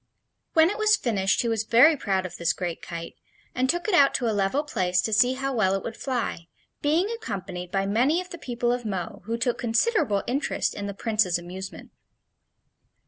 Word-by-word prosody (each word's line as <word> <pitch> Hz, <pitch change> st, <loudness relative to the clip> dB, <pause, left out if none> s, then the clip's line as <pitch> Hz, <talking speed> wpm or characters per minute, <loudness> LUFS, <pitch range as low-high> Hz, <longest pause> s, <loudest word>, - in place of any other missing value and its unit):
When 325 Hz, +2 st, +5 dB
it 420 Hz, -, -5 dB
was 430 Hz, 0 st, +5 dB
finished 200 Hz, -, 0 dB
he -, -, -1 dB
was 225 Hz, -2 st, 0 dB
very 250 Hz, +9 st, +6 dB
proud 190 Hz, -8 st, -1 dB
of 185 Hz, -, -7 dB
this 170 Hz, -1 st, +1 dB
great 175 Hz, -2 st, -4 dB
kite, 165 Hz, -1 st, -7 dB, 0.4 s
and 260 Hz, +1 st, 0 dB
took 345 Hz, +6 st, 0 dB
it 425 Hz, -, 0 dB
out 280 Hz, -5 st, +5 dB
to 245 Hz, -, 0 dB
a 220 Hz, -, +1 dB
level 205 Hz, +8 st, +1 dB
place 185 Hz, -11 st, 0 dB
to 220 Hz, -, -1 dB
see 245 Hz, +4 st, +4 dB
how 270 Hz, +1 st, -3 dB
well 195 Hz, -5 st, +2 dB
it 195 Hz, -, -3 dB
would 225 Hz, -, -5 dB
fly, 230 Hz, -11 st, -3 dB, 0.3 s
being 320 Hz, +6 st, +2 dB
accompanied 190 Hz, -, -5 dB
by 195 Hz, +1 st, 0 dB
many 250 Hz, -, +2 dB
of 365 Hz, 0 st, -8 dB
the 345 Hz, -, -7 dB
people 240 Hz, -3 st, -1 dB
of 245 Hz, 0 st, -3 dB
Mo, 195 Hz, -5 st, -4 dB
who 230 Hz, +2 st, -2 dB
took 245 Hz, 0 st, -1 dB
considerable 230 Hz, -, +1 dB
interest 275 Hz, +5 st, -1 dB
in 200 Hz, 0 st, -5 dB
the 200 Hz, -, -5 dB
Prince's 215 Hz, -5 st, +1 dB
amusement. 185 Hz, +2 st, -8 dB
225 Hz, 200 wpm, -25 LUFS, 195-275 Hz, 0.4 s, very